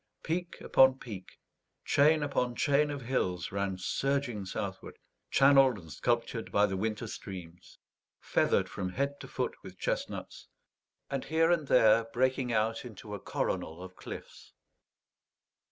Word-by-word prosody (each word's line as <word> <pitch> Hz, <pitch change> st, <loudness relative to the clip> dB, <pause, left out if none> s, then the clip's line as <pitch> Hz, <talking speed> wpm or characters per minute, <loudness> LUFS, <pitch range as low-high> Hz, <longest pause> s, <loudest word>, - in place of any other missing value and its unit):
Peak 175 Hz, +2 st, -3 dB
upon 130 Hz, 0 st, +5 dB
peak, 105 Hz, -8 st, -9 dB, 0.5 s
chain 150 Hz, +2 st, +4 dB
upon 125 Hz, -4 st, -1 dB
chain 145 Hz, +2 st, +3 dB
of 140 Hz, -2 st, -5 dB
hills 95 Hz, -8 st, -1 dB
ran 100 Hz, -1 st, -2 dB
surging 130 Hz, +1 st, -1 dB
southward, -, -, -5 dB, 0.3 s
channeled 135 Hz, -3 st, +6 dB
and 80 Hz, -4 st, -12 dB
sculptured 115 Hz, +3 st, -1 dB
by 105 Hz, 0 st, +4 dB
the 95 Hz, -2 st, -2 dB
winter 110 Hz, +3 st, -2 dB
streams, 90 Hz, -5 st, -9 dB, 0.4 s
feathered -, -, +2 dB
from 95 Hz, -2 st, -4 dB
head 140 Hz, +1 st, -1 dB
to -, -, -8 dB
foot 125 Hz, -, -2 dB
with 95 Hz, -1 st, -11 dB
chestnuts, -, -, -4 dB, 0.6 s
and 135 Hz, -2 st, -2 dB
here 165 Hz, +1 st, +3 dB
and 160 Hz, -5 st, +1 dB
there 115 Hz, -2 st, +5 dB
breaking 130 Hz, +2 st, 0 dB
out 110 Hz, 0 st, 0 dB
into 110 Hz, -3 st, -9 dB
a 100 Hz, -, -4 dB
coronal 80 Hz, -1 st, -3 dB
of 95 Hz, 0 st, -10 dB
cliffs. -, -, -10 dB
120 Hz, 135 wpm, -31 LUFS, 100-140 Hz, 0.6 s, channeled